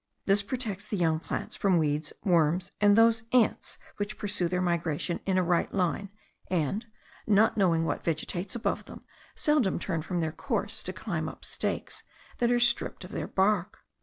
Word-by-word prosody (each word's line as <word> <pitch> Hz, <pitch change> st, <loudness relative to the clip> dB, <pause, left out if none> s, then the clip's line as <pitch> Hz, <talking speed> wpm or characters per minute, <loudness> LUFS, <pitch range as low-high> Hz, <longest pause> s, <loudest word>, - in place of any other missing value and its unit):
This 200 Hz, +1 st, +4 dB
protects 215 Hz, -3 st, -4 dB
the 210 Hz, -, -2 dB
young 160 Hz, -3 st, +2 dB
plants -, -, -4 dB
from 190 Hz, -3 st, +2 dB
weeds, 150 Hz, -1 st, 0 dB
worms, 175 Hz, +1 st, +2 dB
and 205 Hz, 0 st, +6 dB
those 225 Hz, 0 st, +5 dB
ants 245 Hz, -3 st, +2 dB, 0.2 s
which 205 Hz, +1 st, -3 dB
pursue 205 Hz, -4 st, -1 dB
their 180 Hz, +1 st, -1 dB
migration 170 Hz, -1 st, -1 dB
in 190 Hz, -1 st, +2 dB
a 185 Hz, -, +3 dB
right 175 Hz, -1 st, +1 dB
line, 190 Hz, +1 st, 0 dB, 0.4 s
and, 185 Hz, -, -1 dB, 0.4 s
not 215 Hz, +1 st, +4 dB
knowing 170 Hz, -5 st, +3 dB
what -, -, -2 dB
vegetates 175 Hz, +4 st, -2 dB
above 240 Hz, -, -1 dB
them, -, -, -11 dB, 0.3 s
seldom 295 Hz, -10 st, +2 dB
turn 170 Hz, -2 st, -2 dB
from 175 Hz, +2 st, -3 dB
their 160 Hz, -1 st, 0 dB
course 220 Hz, -, -2 dB
to 185 Hz, -, -4 dB
climb 170 Hz, -6 st, -3 dB
up -, -, -9 dB
stakes -, -, -3 dB, 0.4 s
that 240 Hz, -, +3 dB
are 240 Hz, 0 st, +3 dB
stripped 240 Hz, 0 st, +2 dB
of -, -, -10 dB
their -, -, -3 dB
bark. 195 Hz, 0 st, +1 dB
190 Hz, 175 wpm, -29 LUFS, 170-215 Hz, 0.4 s, and